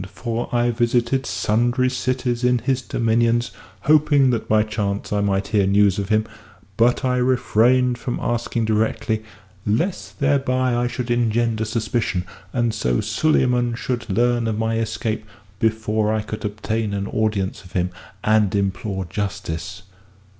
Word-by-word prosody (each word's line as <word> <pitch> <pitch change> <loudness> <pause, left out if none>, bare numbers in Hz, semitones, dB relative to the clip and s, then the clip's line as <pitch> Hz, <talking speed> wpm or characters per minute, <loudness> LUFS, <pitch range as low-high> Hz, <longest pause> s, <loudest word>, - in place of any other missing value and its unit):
For 115 0 -3
I 120 0 +2
visited 120 +2 +1
sundry 120 +4 +1
cities 125 -1 -1
in 125 0 +4
his 130 +2 0
dominions, 115 0 +1 0.3
hoping 145 -3 +4
that 115 -2 -2
by 110 0 +4
chance 105 -1 -3
I 105 - +1
might 100 -1 0
hear 100 -3 +2
news 100 0 +3
of 100 0 -3
him, 110 0 +2 0.5
but 120 +4 +2
I 125 0 +1
refrained 125 0 +2
from 120 +1 -3
asking 120 -1 -1
directly 110 0 0 0.4
lest 165 - -2
thereby 130 -3 +1
I 120 0 +1
should 125 0 -4
engender 115 -1 +1
suspicion, 110 -4 -1 0.3
and 120 0 0
so 60 - 0
Suleyman 125 -6 +1
should 120 -1 -3
learn 120 +3 +2
of 110 -1 -1
my 115 0 0
escape 110 -1 -2 0.4
before 110 -1 +1
I 110 -1 0
could 110 0 -6
obtain 105 0 -2
an 100 0 -2
audience 105 -3 -1
of 90 - -16
him 90 0 0 0.3
and 105 -2 +3
implore 100 0 -1
justice." 90 -1 -4
115 Hz, 145 wpm, -22 LUFS, 105-120 Hz, 0.5 s, in